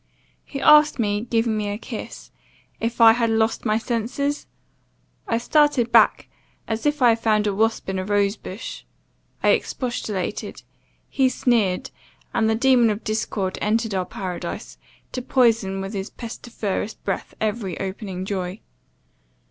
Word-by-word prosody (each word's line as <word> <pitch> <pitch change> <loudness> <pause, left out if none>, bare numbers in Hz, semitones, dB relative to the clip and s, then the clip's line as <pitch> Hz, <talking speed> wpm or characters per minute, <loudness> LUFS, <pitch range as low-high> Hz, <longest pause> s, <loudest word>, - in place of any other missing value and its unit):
He 275 - -6
asked 300 +1 +6
me, 205 -3 0
giving 225 -1 +1
me 210 -1 -2
a 205 - -3
kiss, - - -8 0.5
'If 230 +1 -3
I 225 -1 +9
had 230 -1 +1
lost 225 +1 +1
my 215 -1 +2
senses?' 245 +5 -2 0.8
I 230 - +1
started 260 -1 +2
back, - - +5 0.4
as 225 +5 -1
if 295 -2 +1
I 245 - +7
had 230 0 +3
found 215 -2 +2
a 205 - +1
wasp 225 +3 0
in 190 -1 -2
a - - -2
rose 200 +1 +1
bush. 200 +1 -8 0.6
I - - +4
expostulated. 225 -6 -2 0.4
He 265 -2 +2
sneered: 230 -7 +1 0.4
and 220 -1 +2
the 220 - +2
demon 245 -1 +4
of 210 +1 -3
discord 210 -3 -2
entered 220 +1 0
our 185 -1 0
paradise, 185 -2 -6 0.3
to 255 - -4
poison 225 -7 +2
with 195 +2 -5
his 195 -1 -4
pestiferous 225 -3 -4
breath 195 - -4
every 210 -4 -2
opening 190 -1 -5
joy. 190 0 -3
220 Hz, 150 wpm, -23 LUFS, 200-240 Hz, 0.8 s, I